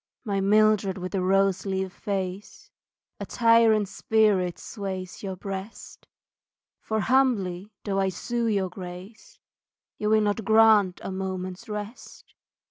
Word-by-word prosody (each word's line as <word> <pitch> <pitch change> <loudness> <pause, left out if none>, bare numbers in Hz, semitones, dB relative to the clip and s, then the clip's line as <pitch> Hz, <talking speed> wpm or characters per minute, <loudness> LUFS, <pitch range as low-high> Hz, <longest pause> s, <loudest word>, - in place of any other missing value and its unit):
My 200 -4 -1
Mildred 210 -1 +3
with 185 0 -5
the 195 - -1
rose 195 0 +2
leaf 190 -1 -3
face, 200 - -5 0.5
A - - -4
tyrant 230 -3 +4
spirit 200 -4 +1
sways 190 -3 -6
your 190 -2 -4
breast, 195 +3 -8 0.7
For 220 0 -2
humbly 210 -7 +1
though 195 -2 -1
I 195 0 +1
sue 235 +5 -2
your 200 -4 0
grace, 180 +3 -10 0.6
You 210 - 0
will 215 0 +4
not 210 +1 0
grant 220 -3 +5
a - - -4
moment's 190 +2 -5
rest. 210 +3 -8
200 Hz, 125 wpm, -26 LUFS, 190-220 Hz, 0.7 s, grant